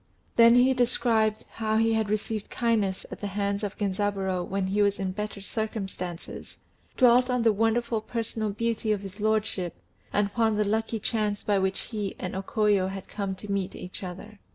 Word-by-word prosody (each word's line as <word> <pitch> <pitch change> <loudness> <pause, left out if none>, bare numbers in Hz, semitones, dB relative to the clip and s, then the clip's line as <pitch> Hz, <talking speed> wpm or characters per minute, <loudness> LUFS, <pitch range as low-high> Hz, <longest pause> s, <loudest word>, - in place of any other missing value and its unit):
Then 235 0 +8
he 255 +2 +6
described 230 -3 +2
how 220 -1 0
he 225 0 +3
had 220 -2 +1
received 215 0 -2
kindness 215 -6 0
at - - -8
the 205 - -2
hands 200 0 -1
of 205 -1 -3
Genzaburô 195 -2 0
when 195 0 -1
he 200 +2 +1
was 200 -1 +3
in 190 -1 -2
better 210 +1 -5
circumstances, 195 -5 -5 0.4
dwelt 250 0 +6
on 250 -2 +1
the 225 -2 +5
wonderful 225 +1 +1
personal 225 -1 -2
beauty 225 +1 -1
of 205 -2 0
his 195 +1 -9
lordship, 215 -4 0 0.4
and 205 - +2
upon 220 +1 +1
the 210 - +2
lucky 220 +2 0
chance 210 -1 -1
by 205 -2 +2
which 190 0 0
he 210 -4 -4
and 185 - -4
O 190 - -1
Koyo 205 -2 +2
had 195 -1 -7
come 200 -2 -3
to 200 +2 -7
meet 195 -2 -1
each 180 - -6
other. 195 +3 -8
210 Hz, 185 wpm, -27 LUFS, 195-225 Hz, 0.4 s, Then